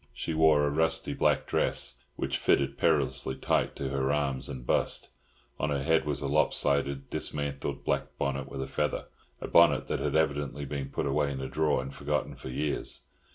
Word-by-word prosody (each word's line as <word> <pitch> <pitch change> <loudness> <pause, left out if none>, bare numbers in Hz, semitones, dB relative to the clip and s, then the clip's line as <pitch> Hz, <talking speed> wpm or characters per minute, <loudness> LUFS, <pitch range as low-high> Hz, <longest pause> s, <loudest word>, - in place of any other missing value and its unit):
She 80 - -3
wore 80 -2 +5
a 70 - +1
rusty 80 +2 +1
black - - +2
dress, 60 0 0 0.2
which - - -1
fitted 70 0 +2
perilously 65 - +1
tight - - 0
to 70 - -3
her 70 0 0
arms 70 -3 -1
and 60 -1 -6
bust; - - 0 0.5
on 70 - 0
her 70 -2 0
head 80 +2 +3
was 75 - -1
a 70 - -1
lopsided, 70 -1 +1
dismantled 70 -1 -3
black 70 0 -1
bonnet 70 -1 -2
with 65 - -4
a - - -6
feather—a 75 0 -4
bonnet - - +5
that - - 0
had - - -1
evidently 75 -2 0
been 70 -1 -4
put - - -2
away 70 0 +1
in 65 - -4
a 65 - -3
drawer 75 -4 +1
and 65 +1 -7
forgotten 75 0 -2
for - - -8
years. 75 +3 -2
70 Hz, 185 wpm, -29 LUFS, 70-75 Hz, 0.5 s, wore